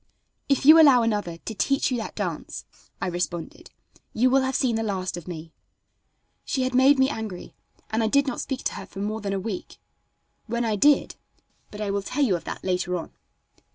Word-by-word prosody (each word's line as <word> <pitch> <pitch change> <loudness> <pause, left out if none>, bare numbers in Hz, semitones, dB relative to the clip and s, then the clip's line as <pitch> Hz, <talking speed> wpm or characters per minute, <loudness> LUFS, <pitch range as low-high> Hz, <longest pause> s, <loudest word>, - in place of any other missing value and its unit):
"If 275 -1 +2
you 320 +2 +9
allow 265 -6 +6
another 205 -7 -1
to 220 - -7
teach 275 +6 +1
you 250 - 0
that 220 - -6
dance," - - -4 0.3
I - - -2
responded, 175 -1 -4 0.4
"you 250 +3 +3
will 270 +1 +4
have 265 0 -1
seen 250 -4 +1
the 225 - 0
last 190 -4 -2
of 175 -1 -9
me." 160 -2 -8 0.9
She 265 - -1
had 255 0 -1
made 265 +3 +5
me 265 0 +4
angry, 220 -9 -6 0.4
and 220 +1 +1
I 220 - +2
did 280 +5 +3
not 265 -4 -3
speak 265 - -4
to - - -1
her 195 -1 -8
for - - -15
more 215 +2 -3
than 200 -1 -3
a 195 - -1
week. 195 -1 -6 0.7
When 235 +1 -1
I 220 -2 0
did 290 +7 +3 0.5
but 210 - -9
I 205 -2 -1
will 200 0 -1
tell 265 +8 -1
you 210 -9 +2
of 170 - -6
that - - -6
later 180 -1 -1
on. 165 - -7
220 Hz, 210 wpm, -25 LUFS, 190-260 Hz, 0.9 s, you